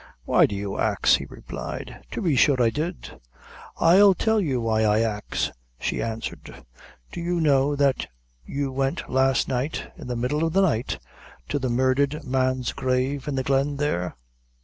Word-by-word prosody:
"Why -, -, +5 dB
do 100 Hz, -, -5 dB
you 100 Hz, 0 st, -4 dB
ax?" -, -, +3 dB
he -, -, -7 dB
replied; -, -, -7 dB
"to -, -, -4 dB
be 165 Hz, -6 st, +2 dB
sure 130 Hz, 0 st, +4 dB
I 115 Hz, -2 st, +3 dB
did." 160 Hz, +6 st, -5 dB, 0.6 s
"I'll 190 Hz, +3 st, +6 dB
tell 220 Hz, +1 st, +2 dB
you 135 Hz, -9 st, 0 dB
why 110 Hz, -1 st, +1 dB
I 105 Hz, 0 st, +3 dB
ax," 105 Hz, -2 st, -2 dB, 0.3 s
she -, -, -2 dB
answered; 115 Hz, 0 st, -6 dB, 0.5 s
"do -, -, -6 dB
you 175 Hz, 0 st, -1 dB
know 145 Hz, -2 st, +3 dB
that 140 Hz, -2 st, +1 dB, 0.4 s
you 140 Hz, -, -3 dB
went 135 Hz, +1 st, -2 dB
last 130 Hz, 0 st, +2 dB
night 130 Hz, +3 st, -3 dB
in -, -, -10 dB
the 125 Hz, -, -2 dB
middle 125 Hz, +6 st, -1 dB
of 165 Hz, -1 st, 0 dB
the 195 Hz, -, +4 dB
night 130 Hz, -10 st, 0 dB, 0.5 s
to 145 Hz, -, 0 dB
the 130 Hz, -1 st, -1 dB
murdhered 135 Hz, +5 st, +1 dB
man's 130 Hz, -1 st, 0 dB
grave, 130 Hz, +2 st, -1 dB
in 145 Hz, -, -2 dB
the 130 Hz, -, 0 dB
glen 140 Hz, +2 st, +1 dB
there?" 140 Hz, -12 st, -1 dB
135 Hz, 170 wpm, -24 LUFS, 125-150 Hz, 0.6 s, I'll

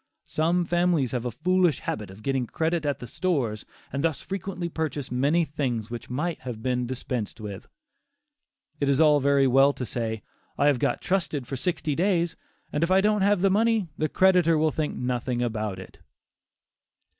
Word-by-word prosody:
Some 170 Hz, +3 st, +1 dB
families 175 Hz, -7 st, +1 dB
have 125 Hz, -1 st, -2 dB
a 125 Hz, -, -1 dB
foolish 180 Hz, +4 st, +2 dB
habit 105 Hz, -2 st, -4 dB
of 100 Hz, +3 st, -13 dB
getting 135 Hz, -2 st, 0 dB
credit 160 Hz, +1 st, -1 dB
at 140 Hz, -3 st, 0 dB
"the -, -, -8 dB
stores," 120 Hz, -, -1 dB, 0.3 s
and 140 Hz, +1 st, -1 dB
thus 160 Hz, -3 st, +1 dB
frequently 190 Hz, -2 st, -4 dB
purchase 150 Hz, -5 st, -3 dB
many 145 Hz, +7 st, +2 dB
things 125 Hz, -7 st, -3 dB
which 115 Hz, -1 st, -6 dB
might 155 Hz, +7 st, -2 dB
have 120 Hz, -4 st, -7 dB
been 125 Hz, -1 st, 0 dB
dispensed 125 Hz, -4 st, -4 dB
with. 105 Hz, -1 st, -7 dB, 1.1 s
It 140 Hz, -, +1 dB
is 140 Hz, 0 st, +3 dB
all 150 Hz, -2 st, +6 dB
very 140 Hz, 0 st, +3 dB
well 135 Hz, +2 st, +5 dB
to 125 Hz, -, -5 dB
say, 110 Hz, -1 st, -3 dB, 0.3 s
"I 140 Hz, -, +2 dB
have 145 Hz, -4 st, +4 dB
got -, -, 0 dB
trusted 165 Hz, -8 st, -1 dB
for 135 Hz, -, -5 dB
sixty 155 Hz, +1 st, -1 dB
days, 170 Hz, 0 st, +1 dB, 0.4 s
and 150 Hz, -, +1 dB
if 170 Hz, -, +1 dB
I 190 Hz, +1 st, +5 dB
don't 210 Hz, +1 st, +2 dB
have 200 Hz, -1 st, +3 dB
the 195 Hz, 0 st, +4 dB
money, 220 Hz, -2 st, +2 dB
the 155 Hz, 0 st, -1 dB
creditor 180 Hz, -4 st, +4 dB
will 155 Hz, 0 st, +2 dB
think 150 Hz, +1 st, -2 dB
nothing 125 Hz, 0 st, -1 dB
about 110 Hz, -4 st, -2 dB
it." 95 Hz, -, -11 dB
145 Hz, 180 wpm, -26 LUFS, 125-175 Hz, 1.1 s, all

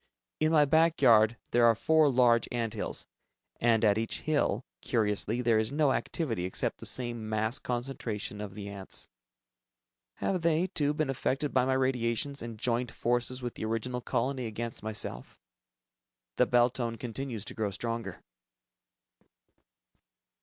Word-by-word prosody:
In 155 Hz, +1 st, +2 dB
my 150 Hz, -2 st, +5 dB
back 160 Hz, +3 st, +3 dB
yard, 115 Hz, -3 st, +5 dB
there 120 Hz, -1 st, +5 dB
are 115 Hz, -, +5 dB
four 160 Hz, +5 st, +4 dB
large 120 Hz, -3 st, +4 dB
ant 115 Hz, -2 st, -2 dB
hills, 110 Hz, -, -3 dB, 0.5 s
and 115 Hz, -1 st, +3 dB
at 105 Hz, 0 st, +4 dB
each 115 Hz, -, -3 dB
hill, 145 Hz, -7 st, 0 dB, 0.2 s
curiously, 110 Hz, +1 st, 0 dB
there 115 Hz, -2 st, +4 dB
is 110 Hz, +3 st, 0 dB
no 145 Hz, -1 st, +3 dB
activity 115 Hz, -, -2 dB
except 95 Hz, -, -2 dB
the -, -, -4 dB
same 120 Hz, -3 st, -2 dB
mass 110 Hz, +5 st, 0 dB
concentration 120 Hz, -5 st, -4 dB
of 100 Hz, -2 st, -7 dB
the 100 Hz, -1 st, -6 dB
ants. 100 Hz, -1 st, -7 dB, 1.1 s
Have 185 Hz, -3 st, -1 dB
they, 165 Hz, +1 st, +2 dB
too, 150 Hz, -5 st, 0 dB
been 155 Hz, -3 st, 0 dB
affected 135 Hz, +2 st, -1 dB
by 130 Hz, -1 st, +3 dB
my 130 Hz, -, +2 dB
radiations 130 Hz, +1 st, 0 dB
and 115 Hz, -2 st, -6 dB
joined 120 Hz, +1 st, 0 dB
forces 120 Hz, +1 st, -1 dB
with 120 Hz, -, -3 dB
the -, -, -5 dB
original 120 Hz, +3 st, -2 dB
colony 130 Hz, 0 st, -1 dB
against 115 Hz, +1 st, -5 dB
myself? 105 Hz, -, -5 dB, 1.0 s
The -, -, +4 dB
bell 120 Hz, 0 st, +4 dB
tone 120 Hz, -2 st, -3 dB
continues 120 Hz, -1 st, -5 dB
to -, -, -7 dB
grow 110 Hz, -2 st, -1 dB
stronger. 115 Hz, +3 st, -4 dB
120 Hz, 150 wpm, -30 LUFS, 110-135 Hz, 1.1 s, my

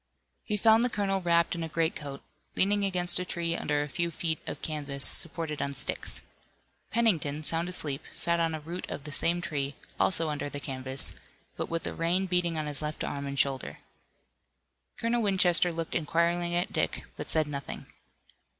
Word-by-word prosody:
He 210 Hz, -, -1 dB
found 220 Hz, +2 st, +5 dB
the 250 Hz, -, +3 dB
colonel 195 Hz, -3 st, 0 dB
wrapped 170 Hz, -1 st, +3 dB
in 170 Hz, -, -3 dB
a 165 Hz, -, -3 dB
greatcoat, 150 Hz, -4 st, -2 dB, 0.3 s
leaning 205 Hz, +2 st, +3 dB
against 180 Hz, -2 st, +2 dB
a -, -, -1 dB
tree 170 Hz, -2 st, -2 dB
under 145 Hz, 0 st, 0 dB
a -, -, -5 dB
few 170 Hz, +4 st, -1 dB
feet 160 Hz, -1 st, -1 dB
of -, -, -6 dB
canvas 145 Hz, -3 st, -2 dB
supported 160 Hz, -2 st, +2 dB
on 140 Hz, 0 st, -2 dB
sticks. -, -, +1 dB, 0.7 s
Pennington, 165 Hz, -10 st, +2 dB
sound 165 Hz, +3 st, 0 dB
asleep, 150 Hz, -5 st, +2 dB
sat 170 Hz, 0 st, +2 dB
on 165 Hz, -1 st, +1 dB
a -, -, -4 dB
root 170 Hz, +4 st, -6 dB
of 140 Hz, -, -5 dB
the 150 Hz, -, -7 dB
same 170 Hz, +4 st, +5 dB
tree, 140 Hz, -4 st, -2 dB, 0.2 s
also 165 Hz, -4 st, +2 dB
under 145 Hz, -1 st, -3 dB
the 145 Hz, -, -5 dB
canvas, 130 Hz, -1 st, -6 dB, 0.4 s
but -, -, -3 dB
with 165 Hz, 0 st, -1 dB
the -, -, -3 dB
rain 175 Hz, +3 st, +1 dB
beating 180 Hz, -3 st, +1 dB
on 155 Hz, -, -1 dB
his 145 Hz, -1 st, -2 dB
left 150 Hz, 0 st, -3 dB
arm 140 Hz, 0 st, -3 dB
and 140 Hz, 0 st, -4 dB
shoulder. 135 Hz, -1 st, 0 dB, 1.2 s
Colonel 235 Hz, +1 st, +1 dB
Winchester 185 Hz, -4 st, +3 dB
looked 165 Hz, -1 st, -4 dB
inquiringly 170 Hz, +2 st, +1 dB
at 175 Hz, +1 st, 0 dB
Dick, -, -, -1 dB
but -, -, -6 dB
said 155 Hz, -1 st, +2 dB
nothing. 140 Hz, -1 st, -5 dB
165 Hz, 180 wpm, -29 LUFS, 145-180 Hz, 1.2 s, found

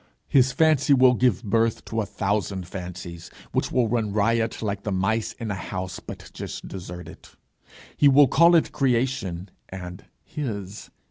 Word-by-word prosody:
His 130 Hz, -1 st, +4 dB
fancy 145 Hz, 0 st, +4 dB
will 130 Hz, -1 st, +6 dB
give 125 Hz, -3 st, +1 dB
birth 115 Hz, +1 st, 0 dB
to 110 Hz, 0 st, -2 dB
a 105 Hz, -, -4 dB
thousand 100 Hz, -2 st, -2 dB
fancies, 90 Hz, -2 st, -8 dB, 0.2 s
which -, -, -1 dB
will 125 Hz, -2 st, +2 dB
run 110 Hz, -2 st, -1 dB
riot 115 Hz, +2 st, 0 dB
like 100 Hz, -2 st, -2 dB
the 105 Hz, -, -3 dB
mice 110 Hz, +4 st, 0 dB
in 115 Hz, -4 st, -5 dB
a -, -, -1 dB
house 95 Hz, -1 st, -5 dB
but -, -, -10 dB
just -, -, -7 dB
deserted: 90 Hz, -2 st, -9 dB, 0.7 s
he 145 Hz, -, +5 dB
will 140 Hz, +1 st, +7 dB
call 170 Hz, +6 st, +5 dB
it 165 Hz, -, +3 dB
creation, 120 Hz, -9 st, -1 dB, 0.2 s
and 90 Hz, 0 st, -8 dB, 0.2 s
his. 105 Hz, -8 st, -6 dB
110 Hz, 155 wpm, -24 LUFS, 95-125 Hz, 0.7 s, will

